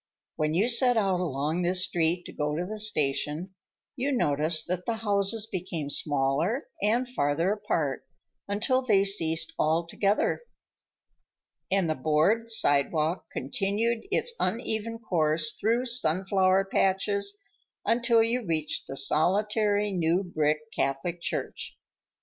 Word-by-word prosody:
When 155 +1 -1
you 200 +7 +2
set 245 0 +4
out 195 -4 +1
along 155 0 -2
this 180 +1 +3
street 170 +1 -1
to - - -9
go 150 0 -2
to 175 +3 -2
the 215 +3 -6
station, 155 -2 0 0.4
you 275 +2 -1
noticed 155 - +1
that 180 0 -4
the 230 - 0
houses 205 0 +1
became 175 -8 -5
smaller 145 - 0
and 230 +5 +1
farther 165 - 0
apart, 165 -10 -2 0.4
until 220 +6 +1
they 210 -6 +3
ceased 165 -5 +2
altogether, 170 - 0 1.3
and 190 -2 +1
the 155 - +1
board 155 - +1
sidewalk 155 -2 +1
continued 225 - -2
its 475 +4 0
uneven 225 -1 -2
course 155 -7 +1
through 235 +3 0
sunflower 190 -3 +2
patches, 200 - +1 0.5
until 235 -1 +3
you 235 +2 -1
reached 155 -5 -2
the 135 - -6
solitary, 205 +6 +1
new 175 +1 +1
brick 155 -4 0
Catholic 150 +6 -2
Church. - - -4
190 Hz, 125 wpm, -27 LUFS, 155-220 Hz, 1.3 s, set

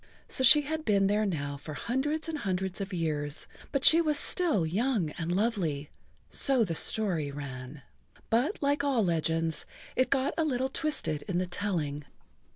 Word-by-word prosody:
So 260 - -1
she 295 +4 +8
had 310 +2 -4
been 200 -6 +3
there 210 +2 +2
now 145 -6 -3
for 150 +2 -8
hundreds 295 - -2
and 315 -2 -3
hundreds 190 -2 -2
of 195 +1 -4
years, 155 -4 -2 0.3
but 275 -1 +3 0.2
was 305 -2 +2
still 315 - +2
young 200 - 0
and 165 +1 -4
lovely—so 200 - -1
the 170 - -3
story 170 -4 +2
ran. 135 -1 -8 0.5
But 260 - +1
like 285 0 +1
all 270 -6 +2
legends, 165 -2 -1 0.3
it 255 - +2
got 270 0 +1
a - - +3
little 265 -3 0
twisted 295 - -1
in 180 - -1
the 185 - +1
telling. 170 -6 -2
195 Hz, 160 wpm, -29 LUFS, 160-265 Hz, 0.5 s, she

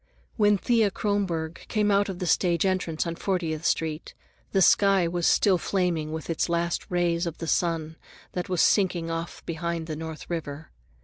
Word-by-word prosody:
When 205 -2 +4
Thea 225 0 +2
Kronborg 185 -6 -2
came 210 -1 +1
out 200 0 +2
of 190 - -4
the 180 - -3
stage 175 +1 +2
entrance 185 -4 0
on 170 - -2
Fortieth 165 -5 -2
Street, 160 -2 -1 0.4
the 195 - +2
sky 195 -3 +4
was 170 0 0
still 190 -3 +4
flaming 170 -6 -1
with 160 -1 -5
the 165 +1 -1
last 170 0 -1
rays 175 -1 +1
of 165 - -5
the 165 - -5
sun 165 -1 -1 0.3
that 180 0 -4
was 180 -3 +2
sinking 175 -5 +2
off 165 +1 -5
behind 170 0 -3
the 160 -1 -5
North 160 0 -7
River. 155 -3 -5
170 Hz, 175 wpm, -26 LUFS, 165-190 Hz, 0.4 s, When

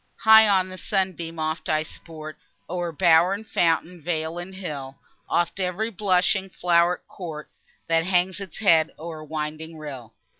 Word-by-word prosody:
High 220 0 +8
on 190 -2 +2
a 185 - -8
sunbeam 180 -4 -2
oft 155 0 -3
I 155 0 +2
sport 155 -1 -10 0.3
O'er 175 -1 -3
bower 170 +3 +4
and 215 +2 -9
fountain, 170 -1 0
vale 160 +1 -2
and 190 +2 -8
hill; 145 -8 -6 0.3
Oft 175 +2 0
ev'ry 190 +5 -1
blushing 190 -1 +1
flow'ret 175 -1 +1
court, 160 -5 -8 0.3
That 165 0 +2
hangs 185 +1 +1
its 195 -4 -8
head 165 -7 +4
o'er 160 -1 -7
winding 155 +1 -5
rill. 130 -7 -9
170 Hz, 150 wpm, -24 LUFS, 155-185 Hz, 0.3 s, High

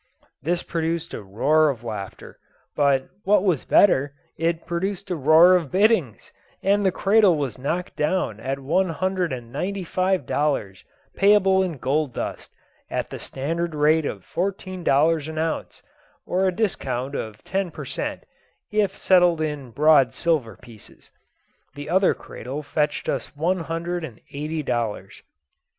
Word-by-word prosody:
This 170 +5 -1
produced 165 0 -2
a - - -5
roar 150 +11 +2
of 120 -4 -4
laughter; 105 -4 -7 0.4
but, 140 -2 +2 0.2
what 200 0 +3
was 180 -9 +1
better, 140 -8 +4 0.2
it 165 0 -1
produced 185 +2 -3
a - - +1
roar 160 +5 +6
of 165 -6 -1
biddings, 190 - +1 0.3
and 200 +1 +3
the 190 - +3
cradle 200 -3 +4
was 135 -3 -3
knocked 170 +7 -3
down 150 - 0
at 135 +4 -3
one 165 +7 0
hundred 185 0 -1
and 120 -2 -6
ninety 190 +8 -3
five 185 -2 0
dollars, 120 -11 -1 0.3
payable 195 -1 +4
in 180 -5 -2
gold 140 +1 -1
dust, - - -5 0.4
at - - -3
the - - -6
standard 165 +4 -3
rate 150 +1 +3
of - - -6
fourteen 185 0 -4
dollars 155 +1 +3
the 160 0 -5
ounce, 160 0 -3 0.4
or 190 +2 +1
a - - +2
discount 140 - -2
of 110 -6 -6
ten 190 -1 -2
per - - -8
cent, - - -4 0.5
if 205 -2 +1
settled 180 -3 +4
in 150 -4 -3
broad 145 +1 +4
silver 135 - 0
pieces. 115 -1 -17 0.6
The 145 +2 -7
other 190 +1 +3
cradle 135 +5 -7
fetched 150 0 -1
us - - -3
one 175 +5 0
hundred 170 +1 -3
and 125 -9 -8
eighty 155 +2 -3
dollars. 115 -6 -3
160 Hz, 150 wpm, -23 LUFS, 140-185 Hz, 0.6 s, roar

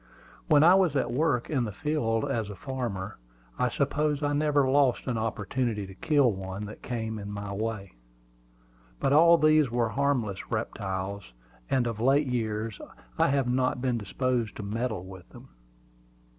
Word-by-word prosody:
When 150 -3 +5
I 175 +3 +8
was 185 -6 +3
at 130 -3 0
work 140 -3 +1
in 135 -5 0
the 110 - -3
field 115 -2 -1
as 110 -3 -2
a 100 - -7
farmer, 110 - -5 0.4
I - - +2
suppose 150 0 0
I 145 0 +1
never 145 -2 +2
lost 135 -2 +2
an 125 - -1
opportunity 110 0 -2
to 95 - -10
kill 140 +5 +2
one 95 +1 -6
that 105 - -10
came 110 -3 -4
in 100 0 -6
my 100 -1 -5
way. 105 -2 -4 1.1
But 135 - +1
all 170 +3 +7
these 155 -3 +4
were 120 -1 0
harmless 125 -8 -1
reptiles, 100 - -4 0.4
and 130 -2 +2
of 115 -2 -3
late 135 +5 +3
years 110 -4 -2 0.4
I - - +5
have 135 -2 +1
not 125 0 +1
been 125 -2 0
disposed 120 +1 -1
to - - -6
meddle 110 -2 -3
with 95 -2 -12
them. - - -14
120 Hz, 165 wpm, -28 LUFS, 105-140 Hz, 1.1 s, I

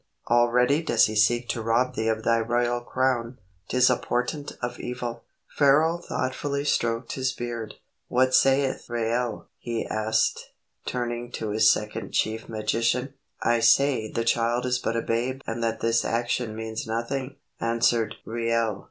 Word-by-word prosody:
Already 125 +5 +4
does 120 -8 +4
he 110 - -3
seek 120 +3 +3
to 115 - -2
rob 115 +3 +1
thee 110 - -2
of 110 0 0
thy 115 0 +3
royal 120 +1 0
crown. 125 -1 -1 0.3
'Tis 125 0 +4
a 125 - +3
portent 135 +4 -2
of 120 0 -4
evil." 120 -1 -5 0.3
Pharaoh 155 +4 +4
thoughtfully 140 0 -3
stroked 115 -3 0
his 130 -1 -1
beard. 120 -3 -5 0.3
"What 130 +1 +2
sayeth 135 -1 +3
Reuel?" 120 0 -1
he 115 -1 -3
asked, 110 0 0 0.3
turning 120 -1 -3
to 110 -2 -3
his 110 +1 +5
second 105 -1 -3
chief 110 +1 -1
magician. 115 +4 0 0.3
"I 120 0 +3
say 115 0 +3
the 115 - -2
child 120 +1 +1
is 125 0 +1
but 115 - -1
a 115 - -1
babe 125 +4 -1
and 115 +1 -3
that 115 -1 -1
this 115 0 +2
action 120 -1 -1
means 110 0 -5
nothing," 130 +4 -3 0.2
answered 115 0 +1
Reuel. 115 -2 -1
120 Hz, 150 wpm, -26 LUFS, 115-125 Hz, 0.3 s, his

